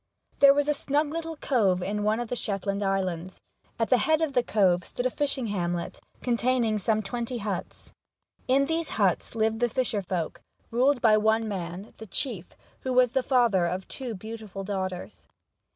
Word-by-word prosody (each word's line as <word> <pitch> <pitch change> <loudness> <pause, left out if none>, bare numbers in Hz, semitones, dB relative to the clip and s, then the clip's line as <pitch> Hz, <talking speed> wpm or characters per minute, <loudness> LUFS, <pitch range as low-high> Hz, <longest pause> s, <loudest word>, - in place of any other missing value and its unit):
THERE 280 0 +8
was 290 0 +1
a 300 - +3
snug 290 +1 0
little 330 0 -4
cove 200 -11 +1
in 205 +3 -2
one 215 +2 +1
of 240 -2 -4
the - - -1
Shetland 200 -2 -2
Islands. 185 -2 -2 0.4
At 225 +2 -1
the 255 - +6
head 310 +7 +3
of 300 -3 -1
the 250 - +4
cove 190 -6 +2
stood 245 - -5
a 255 - +2
fishing 275 -3 -1
hamlet, 175 -4 -2 0.2
containing 235 -2 +1
some 215 +2 +1
twenty 240 +3 -3
huts. 205 -4 -5 0.6
In 270 +2 +4
these 325 +1 -1
huts 195 +1 +1
lived 220 0 +1
the 240 0 +2
fisher 230 -3 0
folk, 175 -3 -3 0.3
ruled 255 +2 +2
by 215 -2 +6
one 220 +1 +2
man 185 0 -5
the 220 - -9
chief 200 - -4 0.2
who 260 - -2
was 250 -1 +4
the 265 - +2
father 235 -9 +3
of 185 +2 -3
two 250 -5 -5
beautiful 215 -1 -7
daughters. 190 -2 -5
220 Hz, 180 wpm, -27 LUFS, 195-255 Hz, 0.6 s, THERE